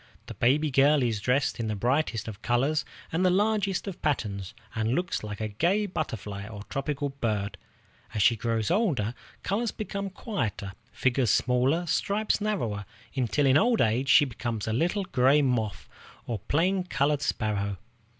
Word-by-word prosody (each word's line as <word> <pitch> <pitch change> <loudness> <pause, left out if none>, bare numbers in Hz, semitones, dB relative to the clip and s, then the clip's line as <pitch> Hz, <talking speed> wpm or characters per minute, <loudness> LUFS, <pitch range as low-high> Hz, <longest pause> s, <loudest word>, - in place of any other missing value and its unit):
The - - -7
baby 145 +5 +2
girl 140 +1 +4
is 115 -4 0
dressed 130 +3 +1
in 115 - -1
the 110 - -1
brightest 120 +1 0
of 110 -1 -7
colors 135 +6 +1 0.3
and 165 +3 +1
the 185 - +5
largest 200 0 +1
of 195 - -6
patterns, 100 -10 -2 0.2
and 110 +2 0
looks 175 -8 -1
like 105 -1 -6
a 110 - -1
gay 175 - +1
butterfly 105 - -4
or 105 -2 -8
tropical 140 +5 -3
bird. 110 -7 -2 0.6
As 105 - +2
she 120 - +5
grows 115 -1 -1
older, 155 - +1 0.3
colors 220 +5 0
become 200 -1 -4
quieter, 120 - -4 0.2
figures 125 -2 +1
smaller, 130 - +2
stripes 205 +5 0
narrower, 120 - -1 0.3
until 135 +2 +1
in 135 +1 +5
old 235 +1 +3
age 120 +5 +2
she 145 - +7
becomes 115 -4 -4
a 110 - 0
little 175 - +1
gray 140 0 +4
moth 110 - -1 0.4
or 115 -3 -3
plain 180 - +1
colored 145 -4 0
sparrow. 100 -6 -1
130 Hz, 160 wpm, -27 LUFS, 110-170 Hz, 0.6 s, she